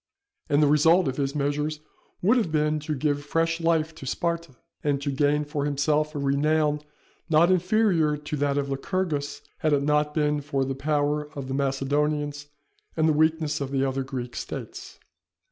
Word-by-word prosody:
And 145 +1 +4
the - - +5
result 160 +4 +4
of 130 - -2
his 140 0 -1
measures 150 +1 -1 0.4
would 215 +7 +5
have 220 -10 +1
been 150 0 +1
to 150 +1 -3
give 145 +1 -1
fresh 165 +2 0
life 165 -1 +1
to 155 -4 -10
Sparta, 170 -2 -2 0.3
and 145 -2 +1
to 140 0 -2
gain 145 +2 +1
for 145 -1 -3
himself 150 +2 0
a - - -2
renown 150 +2 +1 0.5
not 165 +3 +5
inferior 180 -4 +2
to 150 +1 -5
that 140 0 0
of 140 -1 0
Lycurgus, 145 +1 -2 0.2
had 155 -1 +1
it 140 -1 +2
not 150 0 +1
been 150 -1 +1
for 140 -1 -1
the 135 - -2
power 150 +1 0
of 135 -2 -5
the 130 - -3
Macedonians 145 +2 -1 0.5
and 160 0 +3
the 155 - +4
weakness 155 -1 +1
of 140 - -2
the 135 -1 0
other 135 0 -1
Greek 125 -3 -6
States. - - -7
150 Hz, 180 wpm, -26 LUFS, 140-155 Hz, 0.5 s, the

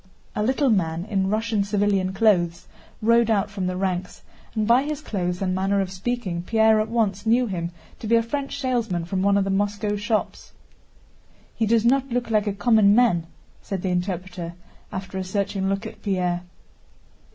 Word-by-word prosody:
A - - -1
little 260 +4 +2
man 170 -4 0
in 195 -3 0
Russian 215 0 0
civilian 200 -2 +1
clothes 180 -5 +2 0.4
rode 230 +1 +4
out 205 -2 +1
from 195 -2 -3
the 185 0 -2
ranks, 185 -1 -3 0.3
and 215 -1 +1
by 235 +4 +5
his 295 +1 -3
clothes 185 -9 -3
and 185 -1 0
manner 195 +2 +1
of 190 -1 -1
speaking 190 -3 -3
Pierre 220 +3 +3
at 215 - -1
once 215 -3 0
knew 240 +3 +4
him 175 -6 -3 0.3
to 220 - -6
be 230 - +4
a 230 - +4
French 275 +4 -4
salesman 230 -10 -1
from 185 +2 -2
one 200 +1 +3
of 200 - +3
the 195 - -1
Moscow 205 +1 0
shops. 210 +1 -2 1.0
"He 225 - 0
does 230 0 +3
not 270 +2 +3
look 240 -1 -2
like 215 -1 +2
a 205 - 0
common 210 -1 +4
man," 215 -9 +3 0.3
said 195 -3 -5
the 190 - 0
interpreter, 180 -1 -3 0.4
after 190 0 -5
a - - -2
searching 195 0 -1
look 195 +3 -2
at 220 - -9
Pierre. 180 -3 0
200 Hz, 185 wpm, -24 LUFS, 185-225 Hz, 1.0 s, by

